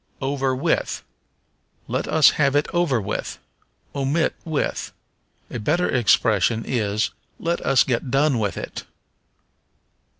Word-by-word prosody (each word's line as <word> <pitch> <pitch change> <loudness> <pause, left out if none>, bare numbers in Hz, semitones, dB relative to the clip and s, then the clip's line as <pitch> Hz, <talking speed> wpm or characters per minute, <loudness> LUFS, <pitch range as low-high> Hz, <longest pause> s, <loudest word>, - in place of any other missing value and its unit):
Over 135 -1 0
with. 160 +5 -1 0.8
"Let - - -2
us 155 -4 +6
have 140 -2 +1
it 145 - +3
over 170 -8 +2
with." 100 - -4 0.6
Omit 140 +4 0
with. 160 -4 -2 0.6
A 120 - -4
better 170 +11 +1
expression 115 -2 +2
is, 110 -3 0 0.3
Let 170 +1 -1
us 135 -3 +4
get 125 0 -1
done 135 -1 +2
with 100 -5 -1
it. - - -6
135 Hz, 120 wpm, -23 LUFS, 115-150 Hz, 0.8 s, us